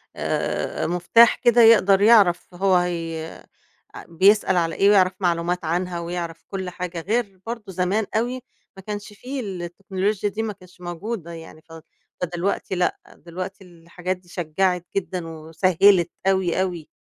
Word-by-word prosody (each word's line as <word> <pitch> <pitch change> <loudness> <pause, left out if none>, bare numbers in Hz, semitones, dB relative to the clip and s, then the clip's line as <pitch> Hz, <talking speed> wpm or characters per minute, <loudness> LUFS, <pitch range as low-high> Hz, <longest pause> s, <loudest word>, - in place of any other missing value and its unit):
آآ - - -2
مفتاح 180 +7 +5
كده 240 0 +4
يقدر 205 -4 +6
يعرف 200 -6 +4
هو 190 +1 +2
هي 165 -2 -1 0.7
آآ - - -9
بيسأل 190 +2 +3
على 165 -1 0
إيه 200 - +4
ويعرف 190 -2 +4
معلومات 175 -1 -1
عنها 175 +2 -2
ويعرف 170 -1 -5
كل 190 -2 -4
حاجة، 180 -1 -5
غير 205 0 -2
برضه 225 -3 -6
زمان 190 +4 0
أوي 245 +3 -1 0.4
ما - - -9
كانش 210 0 -6
فيه 260 +6 -6
التكنولوجيا 195 +1 -3
دي 220 +2 -4
ما 215 -2 -3
كانتش 185 -2 -19
موجودة 175 +1 -5
يعني 160 -1 -11
ف 165 - -17 0.5
فدلوقتي 180 +2 -2
لأ، 180 0 0 0.2
دلوقتي 185 +3 -8
الحاجات 180 +1 -6
دي 180 -1 -26
شجَّعت 180 +1 -1
جدًا 185 -3 -3
وسهِّلت 165 +3 +2 0.2
أوي، 190 -2 +2
أوي 175 -4 -4
185 Hz, 145 wpm, -23 LUFS, 170-200 Hz, 0.7 s, يقدر